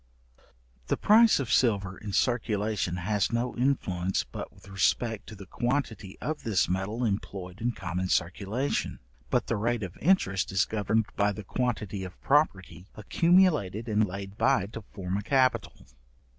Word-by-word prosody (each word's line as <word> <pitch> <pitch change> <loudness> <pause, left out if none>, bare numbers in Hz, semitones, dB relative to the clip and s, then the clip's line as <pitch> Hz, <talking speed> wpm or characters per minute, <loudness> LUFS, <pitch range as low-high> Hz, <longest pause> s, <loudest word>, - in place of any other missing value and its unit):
The - - 0
price 220 -1 +6
of 130 -3 -3
silver 100 -6 +2
in 105 +2 -7
circulation 105 -5 0
has 100 +2 0
no 120 +1 -1
influence 95 -9 0
but - - -8
with - - -19
respect 100 +3 0
to 110 - -9
the 100 -1 -10
quantity 115 -5 -2
of 155 0 -3
this 105 -5 +1
metal 100 +6 -1
employed 100 -2 -4
in 120 +1 0
common 90 -2 -3
circulation; 100 +11 -1 0.3
but - - +1
the 115 - -1
rate 115 +1 0
of 90 -1 -6
interest 120 - +2
is 95 +1 +2
governed 110 +1 0
by 105 0 +2
the 105 +1 -7
quantity 105 -3 -2
of 90 -2 -9
property 95 - +1
accumulated 150 - +2
and 110 -1 +2
laid 100 +2 -7
by 95 - +3
to 115 +2 -8
form 95 -1 -3
a - - -2
capital. 130 -1 +1
105 Hz, 155 wpm, -28 LUFS, 95-120 Hz, 0.3 s, price